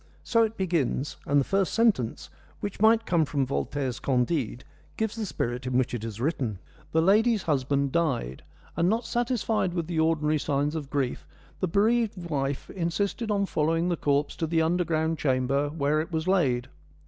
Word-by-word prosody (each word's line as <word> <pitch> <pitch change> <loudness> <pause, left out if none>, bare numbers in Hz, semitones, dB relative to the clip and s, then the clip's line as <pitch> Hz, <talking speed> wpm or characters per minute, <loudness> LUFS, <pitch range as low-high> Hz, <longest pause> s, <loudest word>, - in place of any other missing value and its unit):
So 230 - +2
it 225 0 0
begins, 150 -6 -1
and 145 0 +4
the - - +3
first 195 -1 0
sentence, 210 - +1 0.3
which 205 -1 -5
might 225 +1 +5
come 170 -2 +2
from 140 -2 0
Voltaire's 135 -1 -2
Candide, 125 -1 0 0.3
gives 220 -1 -1
the 220 -3 -3
spirit 125 -5 -3
in 125 -1 +1
which 130 -1 +1
it 120 -3 -3
is 115 -1 -6
written. 125 - -1 0.3
The 160 0 +3
lady's 215 +2 +4
husband 140 -2 0
died, 130 - -1 0.3
and 170 +2 +2
not 230 +3 0
satisfied 235 -6 0
with 170 -2 -1
the 165 -1 -2
ordinary 155 -1 +2
signs 145 +1 0
of 150 -4 -5
grief, 140 -4 -2 0.3
the 185 - 0
bereaved 215 +4 +2
wife 135 -1 -2
insisted 200 +6 -2
on 200 -1 +1
following 165 0 0
the 175 - +1
corpse 145 -1 0
to 160 - -1
the 160 0 +2
underground 165 -2 0
chamber 135 +1 +1
where 150 0 +1
it 165 - -7
was 160 +1 -2
laid. 135 -11 +2
160 Hz, 175 wpm, -27 LUFS, 140-190 Hz, 0.3 s, might